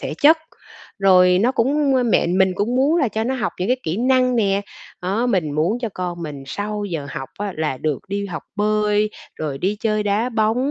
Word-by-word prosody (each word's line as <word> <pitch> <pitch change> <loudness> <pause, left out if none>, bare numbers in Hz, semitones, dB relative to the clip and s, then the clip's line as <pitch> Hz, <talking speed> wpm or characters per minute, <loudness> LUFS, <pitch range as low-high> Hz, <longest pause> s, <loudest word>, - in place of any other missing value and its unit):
thể - - -4
chất. 315 +3 +7 0.6
Rồi 180 -2 +5
nó 250 +4 +2
cũng 275 +4 +2 0.2
mẹ - - +3
mình 185 +2 +2
cũng 215 +6 -1
muốn 285 +6 +3
là 280 -8 +2
cho 220 +2 -2
nó 260 +2 -1
học 235 -3 -2
những 185 - -1
cái 255 - +3
kỹ 160 +4 -2
năng 255 0 +2
nè, 200 -2 +2 0.4
đó, 200 +7 0
mình 185 -10 0
muốn 170 +10 +1
cho 240 - -3
con 175 -2 -4
mình 145 -3 -6
sau 205 +5 -4
giờ 160 -7 -4
học 135 - -6
á 205 -1 -3
là 155 -4 -1
được 150 -4 -1
đi 200 0 -2
học 160 -6 -6
bơi, 210 0 +1 0.3
rồi 145 -3 -4
đi 195 +6 -1
chơi 215 -1 +1
đá 210 +4 0
bóng, 230 +4 +1
205 Hz, 215 wpm, -21 LUFS, 180-235 Hz, 0.6 s, chất